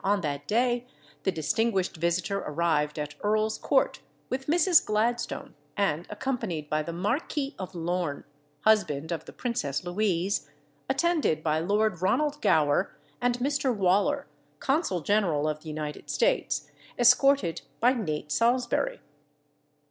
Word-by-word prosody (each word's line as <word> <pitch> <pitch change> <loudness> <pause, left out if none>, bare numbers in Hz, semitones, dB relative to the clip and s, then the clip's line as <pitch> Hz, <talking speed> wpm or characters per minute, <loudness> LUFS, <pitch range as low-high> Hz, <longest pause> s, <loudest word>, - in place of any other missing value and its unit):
on 200 +1 +2
that 145 -3 -3
day 240 +2 +2 0.4
the 190 - +1
distinguished 185 +5 0
visitor 170 +4 0
arrived 150 -2 0
at 150 0 -4
Earl's 215 +1 +1
Court - - +2 0.3
with 265 +1 -3
Mrs. 345 +2 +5
Gladstone, 230 +3 -1 0.2
and 175 -5 0
accompanied 210 - -3
by 155 0 +2
the 170 - -5
Marquis 270 - -2
of 185 -1 -6
Lorne 175 -3 -2 0.4
(husband 170 -8 +2
of 165 -2 -3
the - - -10
Princess 170 - -2
Louise), 180 -3 0 0.4
attended 290 - +1
by 155 0 +1
Lord 200 +1 +1
Ronald 295 +10 +1
Gower 145 -2 +2 0.2
and 245 0 +1
Mr. 275 +1 0
Waller 205 +10 +2 0.3
(Consul 270 - 0
General 170 -6 +1
of 155 0 -2
the 160 - -13
United 150 -1 -5
States), 150 0 0 0.3
escorted 245 -6 +4 0.2
by 245 +3 +4
Nate 155 - -3
Salsbury. 245 - +1
195 Hz, 130 wpm, -28 LUFS, 155-245 Hz, 0.4 s, Mrs